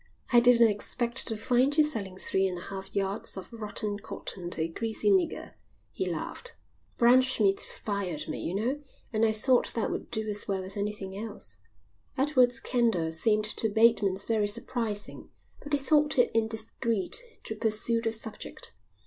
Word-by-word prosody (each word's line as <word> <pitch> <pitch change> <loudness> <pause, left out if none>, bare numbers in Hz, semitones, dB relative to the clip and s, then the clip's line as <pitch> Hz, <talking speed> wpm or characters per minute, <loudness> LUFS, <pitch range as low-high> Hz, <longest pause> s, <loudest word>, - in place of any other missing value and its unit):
"I 240 - +9
didn't 235 -1 +7
expect 235 +4 -2
to 225 - -3
find 255 +6 +2
you 310 - +7
selling 200 -11 -3
three 190 0 +2
and 180 -1 -4
a - - -7
half 195 +1 -7
yards 195 +1 -2
of 190 - -9
rotten 210 -2 -3
cotton 180 -3 -7
to 165 - 0
a 160 - +1
greasy 225 - 0
nigger," 365 -4 +1 0.4
he - - -2
laughed. 485 -1 -4 0.4
"Braunschmidt 240 -5 +4
fired 195 -7 -3
me, - - -4
you 175 - -3
know, 250 +8 -1 0.3
and 220 +1 +1
I 220 - +4
thought 245 +4 +3
that 230 - 0
would - - -5
do 220 -1 -3
as 205 -1 -4
well 195 -2 -1
as 190 +1 -2
anything 200 -2 -4
else." 215 +1 -6 0.6
Edward's 255 -4 +3
candour 225 -10 +1
seemed 210 +6 +2
to 220 +1 +1
Bateman 215 -3 +4
very 215 -2 +2
surprising, 215 -1 -2 0.3
but 290 - -9
he - - +5
thought 295 +2 +2
it 245 - +4
indiscreet 225 - 0 0.2
to 220 - -4
pursue 225 +1 0
the 225 -1 0
subject. 220 -1 -7
220 Hz, 165 wpm, -29 LUFS, 200-240 Hz, 0.6 s, I